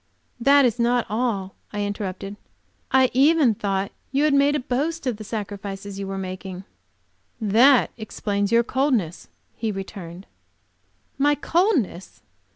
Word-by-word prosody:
"That 280 +3 +5
is 240 -1 0
not 240 0 +2
all," 210 -4 -1 0.2
I 205 0 -2
interrupted, 200 -1 -4 0.6
"I 260 -1 +4
even 280 -1 +4
thought 195 -1 -2 0.2
you 275 +2 +1
had 305 -1 +3
made 280 +1 +4
a - - +1
boast 285 +6 -2
of 245 -5 -1
the 215 - -8
sacrifices 200 -2 -6
you 195 - -4
were 195 0 -4
making." 185 0 -6 0.8
"That 235 +5 +5
explains 205 -2 -2
your 235 0 +5
coldness," 235 - -1 0.3
he 225 -1 -2
returned. 190 -2 -8 0.9
"My 290 +1 +4
coldness! 300 - 0
220 Hz, 135 wpm, -23 LUFS, 195-265 Hz, 0.9 s, That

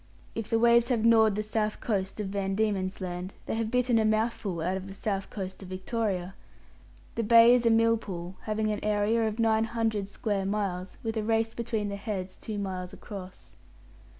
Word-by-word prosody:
If 225 -2 -4
the 225 - +3
waves 235 +1 +5
have 230 -3 +1
gnawed 220 -3 +5
the 215 - -1
south 215 0 -1
coast 195 -3 -2
of 205 -2 -2
Van 195 -1 -1
Diemen's 195 -3 -1
Land, 180 +1 -5
they - - -3
have 225 -1 -1
bitten 250 -1 +2
a - - +3
mouthful 215 -4 0
out 180 +4 0
of 190 0 -5
the 195 - -9
south 195 -2 -2
coast 190 -2 -6
of 190 - -9
Victoria. 190 -1 -2 0.8
The 230 - -1
Bay 230 +2 +7
is 245 -1 +3
a - - +6
millpool, 225 -6 +1
having 215 0 0
an 210 - -3
area 215 +2 +2
of 215 0 -3
nine 225 -1 +3
hundred 225 -3 -1
square 200 -1 -2
miles, 195 -3 -2
with 225 -1 -2
a 215 - 0
race 225 +1 +1
between 225 -3 -2
the 200 - -4
heads 195 -3 -4
two 215 -2 -6
miles 185 -2 -4
across. 190 -2 -10
215 Hz, 195 wpm, -28 LUFS, 195-225 Hz, 0.8 s, Bay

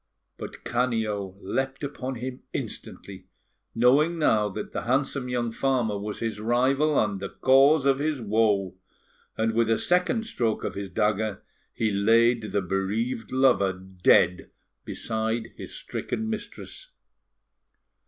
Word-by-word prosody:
But - - -8
Canio 110 -6 -1
leapt 135 +8 -3
upon 135 -2 -4
him 125 +2 -6
instantly, 95 -2 -6 0.5
knowing 140 +8 +4
now 110 -9 +2
that 105 +2 -6
the - - -2
handsome 130 +1 0
young 120 -2 -1
farmer 120 -3 0
was 105 +1 -5
his 115 -2 -3
rival 130 +7 +2
and 105 -3 0
the 100 0 -5
cause 135 +2 +4
of 135 -1 +3
his 150 -1 -1
woe; 105 -4 +1 0.6
and 110 0 +1
with 115 0 +2
a 115 - +3
second 180 - +1
stroke 115 - -1
of - - -3
his 100 -1 -5
dagger, 105 +1 -1 0.3
he 110 -2 -1
laid 115 +2 +3
the 100 - 0
bereaved 105 +6 -2
lover 130 -7 +3
dead 90 -1 +2 0.4
beside 110 +1 -2
his - - -8
stricken 220 - -4
mistress. 220 - -7
115 Hz, 135 wpm, -26 LUFS, 105-135 Hz, 0.6 s, knowing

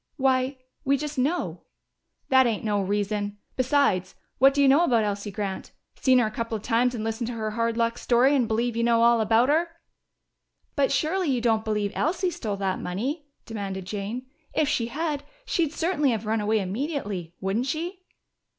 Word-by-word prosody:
"Why 260 0 +1 0.3
we 275 +1 +2
just 295 0 -4
know." 300 +8 -1 0.7
"That 260 -1 +6
ain't 225 -3 -1
no 205 -2 +1
reason! 205 +1 -1 0.2
Besides, 255 -8 +1 0.2
what 270 +2 +7
do 285 - -2
you 280 - +6
know 280 +5 +6
about 235 -9 +3
Elsie 205 0 -2
Grant? 200 -1 -5 0.2
Seen 260 -1 +3
her 245 - +4
a 215 - -2
couple 230 +1 -3
of 210 - -12
times 245 +1 +2
and 220 - -4
listened 225 +1 -2
to 240 - -4
her 215 -1 -3
hard 230 +1 -1
luck 230 0 0
story 255 +4 +3
and 250 -4 +2
believe 230 +1 0
you 235 - 0
know 230 -1 +3
all 235 -1 +5
about 225 +4 +3
her!" 330 +3 +2 1.1
"But 280 -2 +2
surely 355 +1 +1
you 255 -2 +1
don't 225 -2 +1
believe 210 -2 -1
Elsie 355 +3 0
stole 215 -10 -4
that 190 -1 -1
money?" 265 - -3 0.2
demanded 195 -4 -5
Jane. 210 +6 -4 0.3
"If 305 - +2
she 255 -6 0
had, 295 +2 -2 0.2
she'd 330 -10 0
certainly 320 -3 +1
have 225 -3 -1
run 220 0 0
away 215 +1 +1
immediately. 200 - -3
Wouldn't 200 +7 -1
she?" 345 +5 -3
235 Hz, 185 wpm, -26 LUFS, 210-280 Hz, 1.1 s, what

